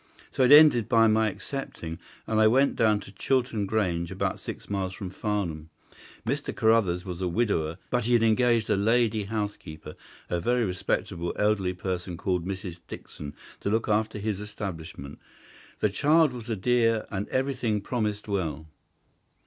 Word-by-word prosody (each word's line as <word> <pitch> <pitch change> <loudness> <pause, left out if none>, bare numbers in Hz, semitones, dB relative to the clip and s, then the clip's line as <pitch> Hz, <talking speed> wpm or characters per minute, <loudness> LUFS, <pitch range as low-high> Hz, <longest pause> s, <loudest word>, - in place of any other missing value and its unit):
So - - -2
it 130 +1 +5
ended 145 -7 +7
by 115 -2 +5
my 110 0 +3
accepting, 90 - -6 0.3
and 110 0 +1
I 110 - +7
went 135 +5 +3
down 110 -2 +3
to 100 - -11
Chiltern 115 -1 0
Grange, 90 -6 0
about 95 - -2
six - - -8
miles 95 -2 -2
from 95 -3 -6
Farnham. 95 -7 -3 0.6
Mr. 140 +5 -2
Carruthers 105 -6 +2
was 90 -1 -6
a 90 - 0
widower, 85 -5 0
but 125 -2 +1
he 120 - +1
had 115 -1 +4
engaged 115 0 +3
a - - +4
lady 110 +1 +2
housekeeper, 100 -8 -5 0.3
a 85 - -1
very 120 +6 +1
respectable, 90 -2 -2
elderly 105 -3 +1
person, 90 -1 -4
called 90 -1 -1
Mrs. 95 -3 -5
Dixon, 75 -1 -9 0.2
to - - -2
look 110 +2 0
after 105 0 +1
his 105 -1 -2
establishment. 90 -9 -7 0.6
The 105 - +3
child 150 +7 +3
was 120 -2 -8
a 115 - 0
dear, 115 +1 +2
and 100 +1 -3
everything 130 -5 0
promised 105 -1 -2
well. 80 -7 -2
105 Hz, 160 wpm, -27 LUFS, 90-115 Hz, 0.6 s, ended